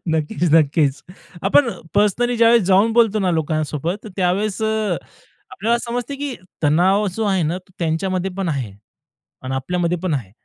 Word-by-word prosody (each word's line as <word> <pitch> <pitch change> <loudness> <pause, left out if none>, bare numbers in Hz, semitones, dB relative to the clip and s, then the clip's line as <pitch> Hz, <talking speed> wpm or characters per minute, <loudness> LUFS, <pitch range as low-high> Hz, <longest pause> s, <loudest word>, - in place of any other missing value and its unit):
नक्कीच, 160 0 -2
नक्कीच, 150 -2 +3 0.4
आपण 235 +6 +4 0.3
पर्सनली 220 +4 +2
ज्यावेळेस 230 -1 +5
जाऊन 200 +4 +4
बोलतो 225 -2 +3
ना 185 -3 +1
लोकांसोबत, 160 +4 -2
त्यावेळेस, 195 +3 0
अ, 220 -1 0 0.5
आपल्याला 235 -1 0
समजतं, 245 +3 -4
की 285 -3 -3 0.3
तणाव 185 +8 +3
जो 220 - -1
आहे 190 -3 +1
ना, 165 +4 -1
तो 185 0 -23
त्यांच्यामध्ये 185 +3 -1
पण 190 -3 -2
आहे 130 -9 -3 0.7
आणि 130 +1 -4
आपल्यामध्ये 175 +5 -1
पण 180 -5 0
आहे. 115 -9 -4
185 Hz, 150 wpm, -20 LUFS, 160-220 Hz, 0.7 s, ज्यावेळेस